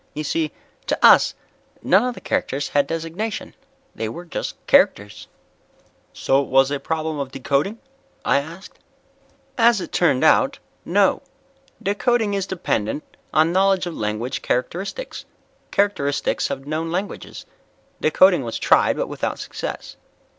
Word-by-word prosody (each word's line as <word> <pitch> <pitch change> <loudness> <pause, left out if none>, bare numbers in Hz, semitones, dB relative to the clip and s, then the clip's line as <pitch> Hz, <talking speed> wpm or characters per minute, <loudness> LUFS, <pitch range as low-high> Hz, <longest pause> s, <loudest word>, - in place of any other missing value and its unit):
You 155 - -3
see, 155 0 -1 0.4
to - - 0
us - - +6 0.5
none 190 +5 +4
of 250 -1 -2
the - - -11
characters 140 +1 -2
had 145 -1 +2
designation. 165 +7 -4 0.4
They 110 - -4
were 170 +10 -8
just 170 - -4
characters." 105 +1 +2 0.8
"So 135 +1 +1
it 140 - -5
was 135 +1 +3
a 145 - -1
problem 160 -1 -3
of 140 -2 -3
decoding?" 140 - -1 0.5
I 140 - +3
asked. 165 +7 -10 0.8
"As 230 -2 +5
it - - -6
turned 150 -7 +2
out, - - +4 0.3
no. - - +2 0.6
Decoding 215 +1 +1
is 195 -1 -1
dependent 150 - -2 0.3
on 160 +2 +3
knowledge 190 0 +3
of 175 - -5
language 110 +4 -3
characteristics 190 - -3 0.4
characteristics 145 -9 0
of 135 0 -5
known 155 +3 -3
languages. 185 +4 -5 0.6
Decoding 180 +2 +5
was 115 -1 -4
tried, - - +3
but - - 0
without - - -3
success. - - -6
160 Hz, 135 wpm, -22 LUFS, 140-195 Hz, 0.8 s, us